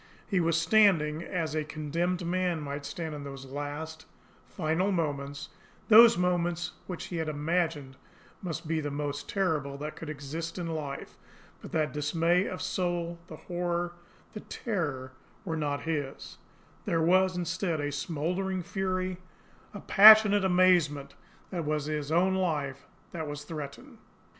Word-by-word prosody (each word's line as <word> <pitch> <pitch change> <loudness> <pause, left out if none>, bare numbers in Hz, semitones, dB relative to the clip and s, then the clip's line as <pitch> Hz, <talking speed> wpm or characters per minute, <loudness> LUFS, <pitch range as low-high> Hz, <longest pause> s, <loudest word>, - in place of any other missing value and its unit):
He 195 -3 0
was 165 -1 +2
standing 165 -4 +4
as 165 -3 -3
a 155 -1 0
condemned 165 +4 -2
man 180 -1 0
might 140 -1 -5
stand 160 +1 -5
in 145 -1 -6
those 135 -1 -8
last, 145 +3 -6 0.4
final 175 +4 0
moments, 145 -4 -2 0.4
those 225 -2 +9
moments 175 -1 0 0.2
which 180 -3 -5
he - - -2
had 160 -1 -2
imagined 150 -3 -1 0.4
must 165 -3 -5
be 160 0 0
the 145 - -3
most 145 0 -4
terrible 155 -8 -1
that 150 +2 -6
could 160 - -8
exist 155 +3 -5
in 175 - -3
life; 155 -4 -5 0.4
but - - -10
that 155 -1 0
dismay 165 +5 +1
of 185 - -5
soul, 175 -2 -2
the 160 - -9
horror, 175 +1 -3 0.4
the 210 - -6
terror 150 - -3 0.3
were 165 -3 -2
not 145 -2 -2
his 145 -4 -4 0.5
there 165 - +1
was, 185 +2 +3
instead, 175 -1 -1
a 145 0 -2
smouldering 180 +6 -2
fury, 185 0 -2 0.5
a - - -8
passionate 210 -1 +8
amazement 180 -6 +3 0.4
that 185 - -4
it 165 - -2
was 150 -1 -1
his 150 -1 -3
own 180 +3 +3
life 150 -7 -2 0.2
that 160 -2 -5
was 145 0 -6
threatened. 145 -3 -8
165 Hz, 150 wpm, -29 LUFS, 150-180 Hz, 0.5 s, those